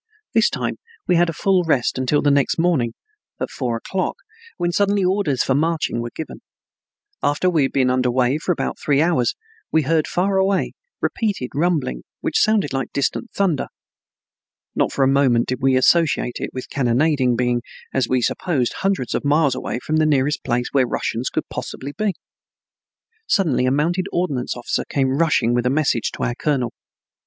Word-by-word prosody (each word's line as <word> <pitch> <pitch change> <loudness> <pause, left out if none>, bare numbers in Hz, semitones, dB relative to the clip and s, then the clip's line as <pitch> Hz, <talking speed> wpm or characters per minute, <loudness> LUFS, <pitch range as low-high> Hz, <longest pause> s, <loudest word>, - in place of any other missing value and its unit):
This 225 -1 +4
time - - -3 0.3
we 180 - +3
had 175 0 +3
a - - 0
full 185 +3 +2
rest 135 -6 +1
until 130 +3 +1
the 145 - +4
next 140 -2 +2
morning 165 -9 +1 0.5
at - - -3
four 120 -4 -2
o'clock, 185 +10 -2 0.4
when 175 0 0
suddenly 200 +2 +2
orders 180 -8 +1
for 135 - +1
marching 155 -3 0
were 120 - -4
given. 160 - -7 0.8
After 150 +6 +1
we 160 -4 +2
had 135 - +1
been 130 -2 +2
under 125 0 +1
way 130 +3 +1
for 180 - -1
about 175 - -2
three 140 -2 +1
hours 155 -6 +2 0.4
we 160 - +3
heard 155 +2 +1
far 190 +2 0
away, 190 0 +1 0.3
repeated 200 - -1
rumbling 145 - 0 0.2
which - - 0
sounded 215 -10 +2
like 135 -2 -2
distant 140 - -1
thunder. 185 -8 0 1.1
Not - - +1
for 135 - +1
a - - +4
moment 135 -4 +3
did 130 -1 -2
we 135 0 +3
associate 140 -2 +3
it - - -3
with 130 - -7
cannonading, 130 -1 +2
being, 120 0 +1 0.3
as 130 -3 +1
we 130 -1 +1
supposed, 140 -3 0
hundreds 195 -10 -1
of - - -1
miles 145 -1 +3
away 130 - -3
from 155 - +1
the 155 0 +3
nearest 145 0 +1
place 125 -1 -1
where 130 -3 +3
Russians 120 +1 -2
could - - -3
possibly 140 +2 -6
be. 215 -3 -1 1.1
Suddenly 155 -9 +2
a - - +2
mounted 170 +6 0
ordnance 140 -9 -1
officer 120 - -2
came 135 -1 +1
rushing 140 -8 +2
with 120 0 +1
a - - +3
message 135 -5 +1
to - - -5
our 120 - 0
colonel. 125 -3 -1
140 Hz, 180 wpm, -21 LUFS, 125-170 Hz, 1.1 s, This